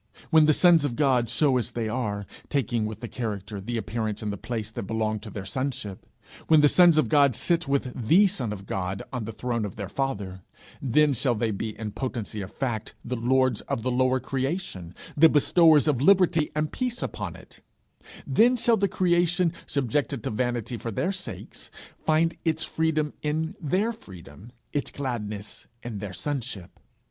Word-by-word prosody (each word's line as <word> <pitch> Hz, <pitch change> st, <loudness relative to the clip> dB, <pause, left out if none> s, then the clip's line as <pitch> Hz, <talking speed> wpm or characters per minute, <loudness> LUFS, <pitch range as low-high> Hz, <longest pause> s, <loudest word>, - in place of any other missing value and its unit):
When 160 Hz, -2 st, +6 dB
the -, -, +6 dB
sons 170 Hz, -1 st, +5 dB
of 135 Hz, -5 st, -1 dB
God 125 Hz, -4 st, +2 dB
show 130 Hz, +3 st, +2 dB
as 120 Hz, -, -3 dB
they 115 Hz, -2 st, -2 dB
are, 105 Hz, -4 st, -2 dB, 0.2 s
taking, 120 Hz, -5 st, 0 dB
with 110 Hz, 0 st, -7 dB
the 120 Hz, -, -4 dB
character, 105 Hz, -4 st, -5 dB
the 120 Hz, +4 st, -3 dB
appearance 110 Hz, -1 st, -3 dB
and 105 Hz, -1 st, -2 dB
the -, -, -3 dB
place 110 Hz, 0 st, -5 dB
that 100 Hz, -, -6 dB
belong 110 Hz, -1 st, -1 dB
to 105 Hz, +1 st, -9 dB
their 100 Hz, -2 st, -7 dB
sonship; 115 Hz, -4 st, -4 dB, 0.4 s
when 155 Hz, -2 st, +6 dB
the 150 Hz, -, +7 dB
sons 175 Hz, +1 st, +6 dB
of 155 Hz, -, +3 dB
God 140 Hz, -5 st, +4 dB
sit 170 Hz, +4 st, +1 dB
with 140 Hz, -2 st, 0 dB
the 190 Hz, -, +6 dB
Son 185 Hz, -, -1 dB
of 100 Hz, -2 st, -7 dB
God 95 Hz, 0 st, -3 dB
on 120 Hz, -4 st, -3 dB
the 115 Hz, -, -5 dB
throne 115 Hz, 0 st, -2 dB
of 100 Hz, -3 st, -5 dB
their 100 Hz, -2 st, -5 dB
Father; 100 Hz, -9 st, -3 dB, 0.4 s
then 145 Hz, +3 st, +3 dB
shall 125 Hz, 0 st, 0 dB
they 110 Hz, +1 st, 0 dB
be 110 Hz, +1 st, -4 dB
in 110 Hz, -2 st, -5 dB
potency 115 Hz, -4 st, -4 dB
of 95 Hz, -, -7 dB
fact 115 Hz, -5 st, -3 dB
the 125 Hz, -, -2 dB
lords 125 Hz, 0 st, +2 dB
of 115 Hz, -, -2 dB
the 130 Hz, -, 0 dB
lower 130 Hz, +1 st, +2 dB
creation, 130 Hz, -, -3 dB, 0.2 s
the 160 Hz, +2 st, +7 dB
bestowers 160 Hz, 0 st, +5 dB
of 135 Hz, -5 st, +2 dB
liberty 175 Hz, -3 st, +4 dB
and 150 Hz, 0 st, -1 dB
peace 250 Hz, -2 st, -2 dB
upon -, -, -5 dB
it; -, -, -15 dB, 0.6 s
then 245 Hz, +3 st, +4 dB
shall 235 Hz, -1 st, +3 dB
the 200 Hz, 0 st, +2 dB
creation, 175 Hz, -1 st, +2 dB
subjected 140 Hz, -2 st, -1 dB
to -, -, -2 dB
vanity 120 Hz, 0 st, -2 dB
for 115 Hz, -, -5 dB
their 180 Hz, -, -1 dB
sakes, 200 Hz, -, -7 dB, 0.3 s
find 160 Hz, +1 st, +2 dB
its 160 Hz, -1 st, 0 dB
freedom 155 Hz, -2 st, 0 dB
in 160 Hz, +4 st, -2 dB
their 185 Hz, +9 st, +1 dB
freedom, 100 Hz, -, -13 dB, 0.2 s
its 145 Hz, -, -1 dB
gladness 110 Hz, -6 st, -5 dB, 0.2 s
in 115 Hz, -4 st, -5 dB
their 100 Hz, -1 st, -5 dB
sonship. 115 Hz, -, -5 dB
125 Hz, 185 wpm, -26 LUFS, 110-155 Hz, 0.6 s, the